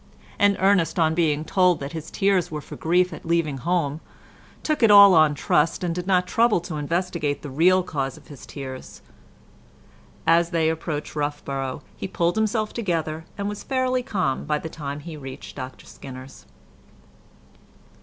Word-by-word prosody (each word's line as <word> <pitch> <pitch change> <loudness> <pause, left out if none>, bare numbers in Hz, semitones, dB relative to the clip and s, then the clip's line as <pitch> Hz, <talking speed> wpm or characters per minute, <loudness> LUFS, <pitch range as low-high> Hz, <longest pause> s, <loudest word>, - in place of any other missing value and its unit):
and 205 -1 +4
Ernest, 185 -4 +2
on 160 -2 +3
being 155 -2 +1
told 180 -1 +3
that 140 +1 -6
his 160 -1 -7
tears 195 -3 +1
were 150 - -4
for - - -10
grief 180 +3 +1
at - - -9
leaving 165 -5 0
home, 165 -1 -1 0.6
took 305 -3 -1
it 225 - +6
all 200 -1 +9
on 155 -3 +5
trust, 150 +5 +1
and 175 -2 -1
did 180 +1 -5
not 180 -2 +3
trouble 225 +1 +3
to 165 -2 -6
investigate 165 -1 -2
the 145 - -6
real 180 +6 +4
cause 135 -6 -3
of - - -17
his 145 -3 -12
tears. 130 -2 -8 1.2
As 165 +1 +4
they 165 -2 +1
approached 160 -2 -4
Roughborough 145 -2 -3
he - - -5
pulled 175 -2 0
himself 220 0 0
together, 165 -7 -2
and 200 0 -2
was 205 0 -5
fairly 255 -1 0
calm 185 - -2
by 150 0 0
the 160 - -6
time 145 -2 -6
he 165 +1 -8
reached 135 -3 -9
Dr 130 -1 -8
Skinner's. 130 0 -11
165 Hz, 165 wpm, -24 LUFS, 145-185 Hz, 1.2 s, all